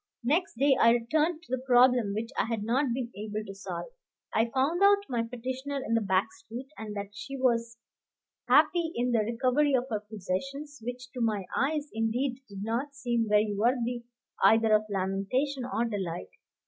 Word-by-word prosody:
Next 315 +8 +1
day 275 +2 +4
I 230 - +7
returned 310 +8 +1
to 360 - -17
the 255 -1 -1
problem 245 -4 +4
which 225 +2 -3
I - - +1
had 225 -2 -2
not 255 +6 +1
been 240 -1 -3
able 215 +1 -4
to 195 - -7
solve. 195 0 -6 0.5
I 225 +1 +2
found 275 +9 +1
out 400 0 +6
my 240 -3 0
petitioner 260 +4 -4
in 230 - -1
the 230 - +3
back 190 -2 +1
street, 250 +4 -9
and 215 -1 -7
that 200 0 -5
she 275 +6 -6
was 235 -2 +1 0.7
happy 340 -2 +4
in 245 +1 0
the 235 - +3
recovery 255 +6 +2
of 250 0 +1
her 215 - 0
possessions, 225 +8 -5
which 245 +1 -6
to 255 -2 -5
my 215 -4 0
eyes 295 +2 0
indeed 245 +4 -1
did 200 0 -7
not 245 +6 -2
seem 240 -5 -1
very 210 0 +3
worthy 240 +2 0 0.4
either 225 -1 +5
of 215 0 +4
lamentation 200 +8 -1
or 235 - +1
delight. 190 -6 -4
240 Hz, 180 wpm, -29 LUFS, 215-265 Hz, 0.7 s, I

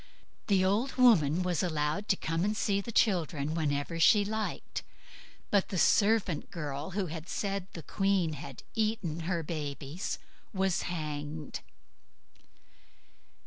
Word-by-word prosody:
The 190 -2 +4
old 215 +8 +1
woman 185 - +5
was 180 -3 0
allowed 155 +3 -1
to 195 - +3
come 165 -1 -1
and 210 +1 0
see 200 -1 +1
the 235 - -6
children 165 -9 +1
whenever 155 +1 -1
she 205 +4 +6
liked. 220 +1 -3 0.7
But 200 -2 +3
the 190 - -2
servant 200 -3 +3
girl, 150 -4 -4
who 195 -3 0 0.2
said 195 -2 -2
the 165 - -7
queen 195 -2 +1
had 145 0 -8
eaten 215 -7 -1
her 170 -3 0
babies, 150 +1 -4 0.4
was 190 -1 +1
hanged. 150 -3 -4
180 Hz, 125 wpm, -31 LUFS, 155-200 Hz, 0.7 s, she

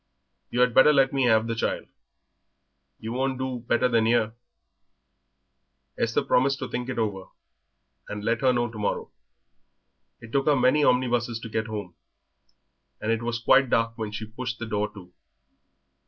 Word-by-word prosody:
You 125 - 0
had 125 -1 +3
better 130 +5 +7
let 135 -2 +3
me 135 -2 +2
have 110 -2 +4
the 115 - -2
child; 115 - -2 1.1
you 110 - -6
won't 130 +1 -1
do 130 -1 -3
better 120 +1 +1
than 115 -2 +2
'ere." 110 -2 +2 1.6
Esther 115 0 0
promised 135 +2 +2
to 130 - -5
think 125 +1 -4
it 130 - -4
over 100 -4 -2 0.8
and 105 0 -5
let 115 +2 0
her 130 -1 +4
know 120 -1 0
to 110 -1 -9
morrow. 105 - -2 1.1
It 115 -1 -12
took 135 +2 0
her 150 - +5
many 135 +3 +3
omnibuses 120 -3 +1
to 115 - -7
get 110 +1 -2
home, 105 -5 -6 1.1
and 110 - -1
it 115 0 0
was 120 0 -2
quite 130 +2 +4
dark 115 0 +1
when 110 -2 -5
she 110 +1 -5
pushed 120 +2 -5
the 115 - -5
door 105 -1 -2
to. 90 -3 -13
120 Hz, 170 wpm, -26 LUFS, 110-130 Hz, 1.6 s, better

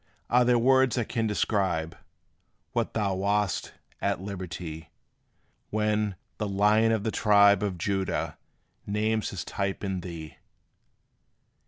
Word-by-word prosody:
Are 125 +1 +5
there 120 0 +4
words 130 0 +4
that 120 -4 -1
can 115 -3 0
describe 95 -6 0 0.8
What - - -1
thou 100 -3 +1
wast, 100 0 0 0.3
at - - 0
liberty, 90 -4 -6 0.8
When 105 -1 0 0.2
"The 105 - -1
Lion 105 +3 +3
of 110 -2 0
the 110 - -1
tribe 100 -3 +5
Of 100 -3 -2
Judah" 95 +2 -2 0.5
names 110 +1 0
his 95 - -5
type 100 0 -3
in 95 -2 -2
thee? 85 -3 -8
100 Hz, 125 wpm, -27 LUFS, 95-110 Hz, 0.8 s, Are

